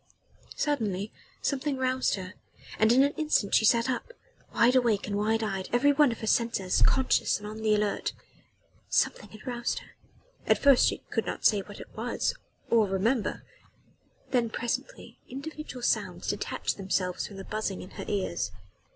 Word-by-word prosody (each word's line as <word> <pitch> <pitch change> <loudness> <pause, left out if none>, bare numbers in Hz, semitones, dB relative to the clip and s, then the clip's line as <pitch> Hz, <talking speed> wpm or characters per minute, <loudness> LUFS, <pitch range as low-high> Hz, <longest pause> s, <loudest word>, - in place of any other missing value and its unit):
Suddenly 215 -9 -1 0.3
something 280 0 -1
roused 260 0 +1
her, 185 -1 -7 0.5
and 220 +1 +5
in 260 +3 +6
an 285 +1 +1
instant 300 -10 +1
she 220 - +5
sat 230 +2 +4
up 255 - -2 0.4
wide 245 +2 +4
awake 235 -5 +3
and 200 - -3
wide 220 +2 +1
eyed, 195 -3 -3
every 265 +4 +4
one 290 -2 +5
of 230 - -6
her - - -3
senses 220 -5 +1
conscious 265 -1 +3
and 205 - -10
on 215 +1 -6
the 215 -1 +3
alert. 210 -1 0 0.8
Something - - +1
had 215 0 -13
roused 240 -1 -2
her - - -9 0.6
at - - +5
first 280 -3 +6
she - - -2
could - - -1
not - - -4
say 210 - +5
what 205 +1 -9
it - - -12
was - - -1 0.4
or 225 -3 +5
remember. 210 +5 0 0.9
Then 240 -3 +2
presently 240 - -4
individual 280 -1 -7
sounds - - 0
detached - - -2
themselves 185 -2 -1
from 200 - -11
the 195 - -6
buzzing 215 -3 -3
in 185 - -12
her - - -7
ears. 200 -2 -1
230 Hz, 170 wpm, -28 LUFS, 205-260 Hz, 0.9 s, in